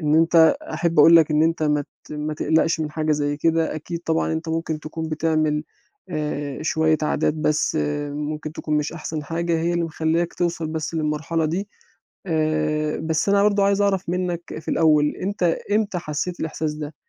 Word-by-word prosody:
إن 150 -1 +1
أنت 165 0 +5 0.2
أحب 165 0 0
أقول 165 +3 +9
لك 160 -2 +4
إن 150 +1 +3
أنت 165 0 +1
ما 150 -1 +1 0.2
ت - - -11
ما 150 0 -3
تقلقش 160 +2 +1
من 155 -1 -2
حاجة 155 0 0
زَيّ 145 -1 0
كده، 165 +1 +1
أكيد 165 +2 -5
طبعًا 160 0 0
أنت 160 +1 -3
ممكن 160 -1 -2
تكون 160 +1 -5
بتعمل 155 -1 0 0.4
آآ، 150 -4 -3
شوية 160 0 +2
عادات 150 0 +1
بَس 155 0 0 0.3
ممكن 150 +1 -4
تكون 155 -1 -2
مش 150 +1 -1
أحسن 155 -2 -5
حاجة، 170 +2 -1
هي 170 +1 0
اللي 170 -1 0
مخلّياك 165 +1 -1
توصل 170 -2 -1
بَس 155 +1 -4
للمرحلة 160 +1 -1
دي 180 +6 -2 0.6
آآ، 155 -1 0
بَس 160 +3 -1
أنا 200 0 +4
برضه 205 -1 +3
عايز 200 0 +2
أعرف 195 -2 0
منّك 175 -1 -1 0.2
في 160 - -14
الأول، 150 -2 +3
أنت 200 0 -4 0.3
إمتى 205 -3 +1
حسّيت 170 +3 -4
الإحساس 155 -1 -2
ده، 150 0 -6
160 Hz, 180 wpm, -22 LUFS, 155-170 Hz, 0.6 s, أقول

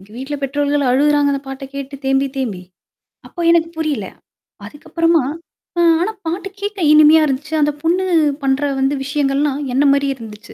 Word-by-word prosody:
எங்க 195 +2 -18
வீட்ல 270 +4 -5
பெற்றோர்கள் 285 +1 0
அழுகுறாங்க, 290 +2 +3
அந்த 275 - -2
பாட்ட 270 +1 -7
கேட்டு 275 0 -6
தேம்பி, 270 +1 +2
தேம்பி. 220 -9 -3 0.7
அப்போ 345 - -8
எனக்கு 330 -1 +2
புரில. 300 -10 -2 0.6
அதுக்கப்பறமா, 330 +6 0 0.6
ஆ - - +4 0.2
ஆனா 395 +5 0 0.2
பாட்டு 355 +4 -3
கேக்க 410 0 -4
இனிமையா 310 +1 +7
இருந்துச்சு. 290 +4 -4
அந்த 295 0 +2
பொண்ணு 355 +3 +1 0.4
பண்ற 270 +1 +1 0.2
வந்து 270 +2 +1
விஷயங்கள்லாம் 280 0 0
என்ன 270 +3 +2
மாரியே 280 -1 0
இருந்துச்சு. 215 -2 -11
285 Hz, 155 wpm, -18 LUFS, 270-315 Hz, 0.7 s, இனிமையா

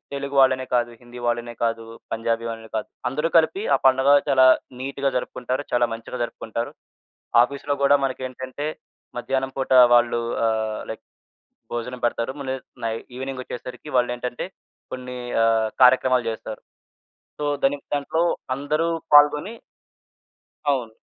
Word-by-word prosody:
తెలుగు 140 0 -4
వాళ్ళనే 130 0 +3
కాదు, 120 0 +1
హిందీ 120 0 -11
వాళ్ళనే 120 0 -2
కాదు, 115 0 -1 0.3
పంజాబీ 115 0 -1
వాళ్ళనే 115 -1 -7
కాదు. 110 - -4 0.2
అందరూ 150 +4 -1
కలిపి 380 - +2
ఆ - - +2
పండగ 130 +1 +3 0.2
చాలా 130 -1 +6 0.4
నీట్‌గా 140 0 -1
జరుపుకుంటారు. 125 +2 -3
చాలా 120 -1 +3
మంచిగా 115 +2 -7
జరుపుకుంటారు. 115 0 -4 0.7
ఆఫీస్‌లో 140 +2 -2
గూడా 140 +1 +6
మనకేంటంటే, 130 +2 -5 0.5
మధ్యాహ్నం 135 +1 -1
పూట 135 - -3 0.2
వాళ్ళు 120 0 +3 0.3
ఆహ్, 110 -1 -1
లైక్ - - -9 0.7
భోజనం 125 +1 -4
పెడతారు. 120 +1 -1
మళ్లీ 135 -1 -3 0.3
నై 115 -1 -1 0.2
ఈవెనింగొచ్చేసరికి 130 +1 -7
వాళ్ళేంటంటే 125 0 -1 0.5
కొన్ని 125 0 -6 0.3
ఆహ్, 110 -1 +3
కార్యక్రమాలు 130 0 +5
చేస్తారు. 110 -1 -6 0.8
సో, 150 - -3 0.2
దాని 135 +1 +3 0.2
దాంట్లో 145 +3 0 0.3
అందరూ 150 +4 -1 0.3
పాల్గొని 150 +8 +5 1.2
అవును. 125 -5 -2
125 Hz, 125 wpm, -23 LUFS, 120-140 Hz, 1.2 s, చాలా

